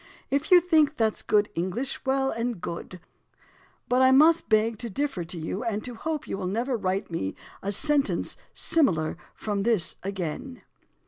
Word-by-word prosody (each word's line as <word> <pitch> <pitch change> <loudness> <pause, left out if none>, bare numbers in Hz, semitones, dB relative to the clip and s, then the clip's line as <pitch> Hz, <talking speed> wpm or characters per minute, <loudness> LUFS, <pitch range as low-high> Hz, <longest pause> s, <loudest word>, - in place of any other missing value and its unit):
If 280 +3 0
you 360 -2 +8
think 310 -4 +3
that's 220 -2 +1
good 205 -1 +2
English, 190 +10 -3
well 270 0 +2
and 230 -2 -3
good; 170 +1 -6 0.9
but 250 +1 +2
I 260 - +6
must 310 +5 +5
beg 220 0 +2
to 235 - -5
differ 270 -4 -2
to 175 +1 -8
you 165 +7 -4
and 215 -3 -2
to 250 - -5
hope 310 +5 -4
you 195 - -4
will 185 - -3
never 235 +7 -1
write 195 -3 -2
me 95 -13 -3 0.3
a 200 - -2
sentence 290 +6 +1 0.2
similar 170 - +2 0.2
from 205 -2 -2
this 215 -5 +1
again." 195 - -5
230 Hz, 170 wpm, -26 LUFS, 190-275 Hz, 0.9 s, you